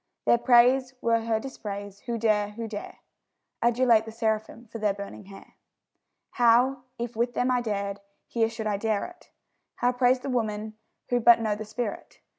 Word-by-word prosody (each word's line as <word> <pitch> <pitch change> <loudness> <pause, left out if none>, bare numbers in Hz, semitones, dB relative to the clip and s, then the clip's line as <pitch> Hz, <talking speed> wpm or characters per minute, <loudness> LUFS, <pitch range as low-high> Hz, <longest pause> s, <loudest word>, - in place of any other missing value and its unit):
Their 235 - +4
praise 250 +2 +4
were 230 -1 +2
her 225 -1 +1
dispraise; 205 -5 -7
who 235 -1 -1
dare, 215 -2 +1
who 230 +1 -5
dare, 210 -2 -8 0.6
Adulate 235 -1 +3
the 225 - -8
seraphim 220 +1 -2
for 230 0 -9
their 210 -2 +1
burning 200 0 -8
hair? 195 0 -14 0.8
How, 245 +2 +4 0.2
if 235 0 -5
with 240 +2 -1
them 250 +1 +1
I 250 -1 +2
dared, 200 -3 -3 0.3
here 225 -1 0
should 225 -1 -6
I 210 -2 0
dare 215 0 -1
it? 355 0 -14 0.5
How 245 - +1
praise 250 0 +2
the 275 - -5
woman, 215 -3 -2 0.4
who 245 - +2
but 235 0 +7
know 220 -2 0
the 215 +1 -6
spirit? 215 0 -5
230 Hz, 175 wpm, -26 LUFS, 215-245 Hz, 0.8 s, but